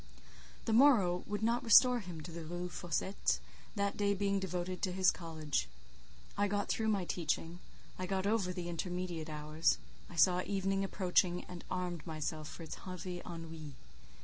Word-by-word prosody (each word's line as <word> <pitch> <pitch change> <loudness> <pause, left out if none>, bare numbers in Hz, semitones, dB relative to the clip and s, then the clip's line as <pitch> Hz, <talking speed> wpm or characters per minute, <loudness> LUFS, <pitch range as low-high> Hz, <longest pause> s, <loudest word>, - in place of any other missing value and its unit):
The 225 - +1
morrow 220 -9 +5
would 210 +1 -2
not 235 +3 +2
restore 245 +2 +7
him 175 -6 -7
to 160 - -8
the 165 0 -6
Rue 175 +2 -4
Fossette, 175 +3 0 0.4
that 200 -1 0
day 200 0 +2
being 200 0 +1
devoted 180 -1 -2
entirely - - -22
to 185 - 0
his 185 0 +5
college. 160 -3 -2 0.7
I 205 0 +2
got 205 0 -1
through 220 - 0
my 200 -4 +1
teaching; 170 0 -2 0.4
I 185 - -2
got 190 0 -1
over 205 -3 +2
the 180 -1 -4
intermediate 175 -1 -3
hours; 155 +1 +1 0.3
I 175 - -10
saw 180 +3 +5
evening 195 0 0
approaching, 180 -2 +2
and 180 -1 -9
armed 180 -3 -3
myself 155 -1 -3
for 165 - -8
its 160 - -7
heavy 180 -1 -6
ennuis. 165 -3 -7
180 Hz, 170 wpm, -34 LUFS, 170-200 Hz, 0.7 s, restore